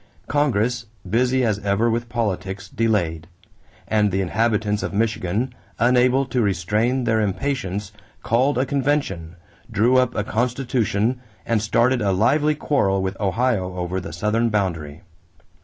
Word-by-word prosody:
Congress, 125 -4 0 0.2
busy 125 +5 +2
as 105 -3 0
ever 100 +3 +1
with 115 +1 -1
politics, 100 -5 -3
delayed; 85 -8 -1 0.6
and 105 -1 +2
the 95 - 0
inhabitants 105 +2 0
of - - -4
Michigan, 110 +2 -1 0.2
unable 125 +2 +3
to 125 -1 -1
restrain 105 +6 +1
their 110 -2 +2
impatience, 105 -3 -2 0.3
called 125 +4 +2
a 130 - +2
convention, 135 - -1 0.3
drew 120 +5 +3
up 130 -1 +2
a 105 - 0
constitution, 120 0 0 0.2
and 115 -2 +1
started 120 +3 +2
a 100 -2 +1
lively 145 +10 +2
quarrel 100 -10 +1
with 95 0 -2
Ohio 100 -3 0
over 90 +1 -2
the 85 - -7
southern 105 +8 0
boundary. 85 -8 -2
110 Hz, 135 wpm, -22 LUFS, 100-125 Hz, 0.6 s, unable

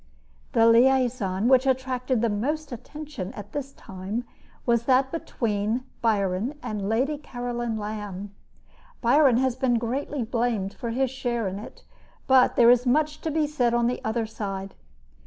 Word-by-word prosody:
The 230 -3 +5
liaison 235 -4 +3
which 260 +1 +5
attracted 255 -2 0
the 235 - +3
most 285 +9 -2
attention 285 -4 -7
at 205 -4 -9
this 275 -1 -4
time 195 +5 -5 0.4
was 235 -1 +2
that 265 +1 +3
between 225 -6 -2 0.2
Byron 210 +4 0
and 210 -4 -3
Lady 270 +7 0
Caroline 240 -4 -4
Lamb. 205 -2 -5 0.7
Byron 260 0 +4
has 260 -1 +1
been 250 -2 +1
greatly 250 +3 -2
blamed 230 -4 -1
for 235 - -5
his 255 +2 0
share 240 -4 -2
in 190 +1 -4
it; 215 - -11 0.4
but 260 -1 +5
there 235 0 +7
is 245 +1 +3
much 300 +3 +1
to 320 - -2
be 310 0 +1
said 250 -5 +1
on 240 0 +2
the 245 +1 -1
other 220 +1 -1
side. 195 -3 -5
240 Hz, 155 wpm, -25 LUFS, 215-265 Hz, 0.7 s, there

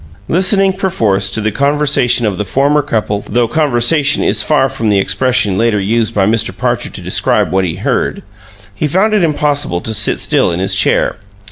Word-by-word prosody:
Listening 190 +2 +2
perforce 110 - -1
to 110 - -2
the 110 +1 -1
conversation 140 -2 +1
of 100 -4 -2
the - - 0
former 140 +8 +1
couple 110 -7 -2
though 120 +1 +1
"conversation" 140 +2 +1
is - - +1
far 145 -3 +1
from 130 -5 -3
the 100 - +2
expression 105 -1 0
later 115 -2 +1
used 110 +3 -1
by 100 -2 +2
Mr. 110 +2 -1
Parcher - - -2
to - - -10
describe - - 0
what 95 0 +1
he 85 - -4
heard - - -2 0.5
he 100 +9 -2
found 195 +8 +1
it 210 -4 +2
impossible 145 - 0
to 110 - -2
sit 105 -1 +2
still - - +1
in 85 - -3
his 95 - 0
chair. - - +1
120 Hz, 190 wpm, -13 LUFS, 105-150 Hz, 0.5 s, Listening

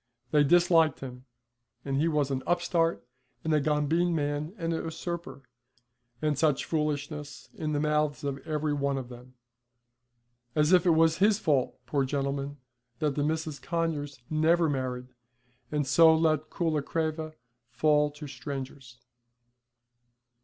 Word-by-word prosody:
They 150 -1 +5
disliked 165 0 +4
him, 125 -1 -8 0.6
and 135 -1 -1
he 150 +4 +2
was 150 -4 +1
an 130 -1 -1
upstart 170 -3 +1 0.4
and 160 - 0
a 150 - +3
gombeen 155 +4 +1
man 145 +1 -2
and 165 -2 -2
a - - -1
usurper, 165 -2 -5 0.8
and 150 -2 +1
such 150 -3 +2
foolishness, 150 -1 -3
in 155 -1 -3
the 145 - +1
mouths 150 -1 0
of 140 -1 -3
every 155 -1 -2
one 140 -1 0
of 130 -2 -6
them. 125 +1 -13 1.2
As 150 +3 +3
if 180 0 +5
it 165 -2 +5
was 160 0 +4
his 205 +1 +4
fault, 145 - 0
poor 140 -2 0
gentleman, 140 +1 -2 0.4
that 150 +2 0
the 145 - -1
Misses 155 -1 -2
Conyers 155 -5 -2
never 160 +2 +3
married, 130 -3 -3 0.6
and 150 -1 0
so 160 +4 +6
let 155 -1 +1
Coolacreva 155 0 -2 0.3
fall 150 +4 +3
to 150 +1 -10
strangers. 135 -3 -7
150 Hz, 140 wpm, -28 LUFS, 140-160 Hz, 1.2 s, so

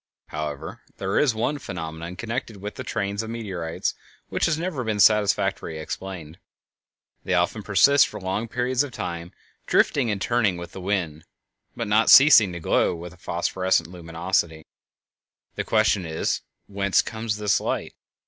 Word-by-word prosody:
However, 75 0 -5 0.2
there 95 +1 0
is 130 -7 +2
one 130 +7 -1
phenomenon 85 - -6
connected 115 0 -4
with 105 +1 -6
the - - -7
trains 100 +1 -2
of 110 - -7
meteorites 95 -8 -3 0.4
which - - +1
has 160 -2 +1
never 165 -6 -3
been 110 -2 -2
satisfactorily 100 -5 +3
explained: 85 0 -7 0.8
they 95 - 0
often 90 +5 +1
persist 105 +8 +5
for - - -8
long 95 +4 -2
periods 125 +2 0
of 145 -2 -2
time, 85 -3 -5 0.4
drifting 130 -5 +2
and 105 -2 -1
turning 110 -4 +1
with 85 -1 -8
the 95 - -8
wind, 90 -5 -2 0.5
but 115 - -3
not 110 +2 +3
ceasing 130 -9 +8
to 85 - -5
glow 85 - +1
with 85 +1 -8
a - - -18
phosphorescent 85 0 0
luminosity. 85 -2 -2 0.9
The - - -3
question 110 -3 +2
is, 80 0 -1 0.2
Whence 100 -1 +1
comes 110 -2 -3
this 105 -4 +2
light? - - -3
100 Hz, 155 wpm, -24 LUFS, 85-110 Hz, 0.9 s, ceasing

